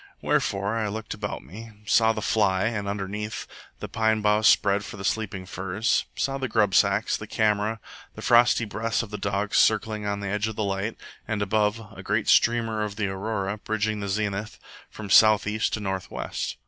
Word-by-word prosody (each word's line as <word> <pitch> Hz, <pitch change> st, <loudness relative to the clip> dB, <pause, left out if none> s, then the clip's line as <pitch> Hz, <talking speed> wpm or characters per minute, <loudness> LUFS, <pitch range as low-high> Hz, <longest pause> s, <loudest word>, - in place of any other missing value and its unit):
Wherefore 105 Hz, -7 st, 0 dB
I 110 Hz, -2 st, -1 dB
looked 110 Hz, +2 st, -5 dB
about 105 Hz, -1 st, -5 dB
me; 110 Hz, -, -11 dB
saw 110 Hz, +2 st, +4 dB
the 110 Hz, -2 st, -4 dB
fly 95 Hz, -4 st, +2 dB
and, 110 Hz, -3 st, -2 dB
underneath, 105 Hz, +2 st, -4 dB, 0.3 s
the -, -, -6 dB
pine 110 Hz, -1 st, +1 dB
boughs 105 Hz, +1 st, +3 dB
spread 100 Hz, 0 st, +4 dB
for 100 Hz, -, -9 dB
the 95 Hz, -, -7 dB
sleeping 100 Hz, -4 st, -2 dB
furs; 95 Hz, +6 st, -1 dB
saw 135 Hz, 0 st, -1 dB
the 130 Hz, -, -2 dB
grub 105 Hz, -4 st, +2 dB
sacks, -, -, +3 dB
the -, -, -7 dB
camera, 110 Hz, +1 st, 0 dB, 0.4 s
the -, -, -9 dB
frosty 120 Hz, -1 st, +4 dB
breaths 115 Hz, +2 st, -2 dB
of 110 Hz, -, -10 dB
the 105 Hz, -, -5 dB
dogs 100 Hz, +1 st, 0 dB
circling 110 Hz, -1 st, +2 dB
on 100 Hz, 0 st, -2 dB
the 100 Hz, -, -4 dB
edge 105 Hz, +2 st, -1 dB
of 110 Hz, -, -5 dB
the 110 Hz, -, -1 dB
light; 100 Hz, +2 st, -2 dB, 0.3 s
and, 105 Hz, -2 st, -1 dB
above, 105 Hz, +1 st, -1 dB
a -, -, -9 dB
great -, -, -1 dB
streamer 115 Hz, -2 st, +3 dB
of 105 Hz, -1 st, -3 dB
the 105 Hz, -1 st, -1 dB
aurora, 100 Hz, +1 st, -3 dB
bridging 110 Hz, 0 st, -2 dB
the 100 Hz, -1 st, -4 dB
zenith 105 Hz, +1 st, -2 dB, 0.3 s
from 105 Hz, -3 st, -8 dB
south 110 Hz, -1 st, +6 dB
east 105 Hz, +1 st, -1 dB
to -, -, -1 dB
north 95 Hz, -2 st, -4 dB
west. -, -, -4 dB
105 Hz, 195 wpm, -25 LUFS, 100-110 Hz, 0.4 s, south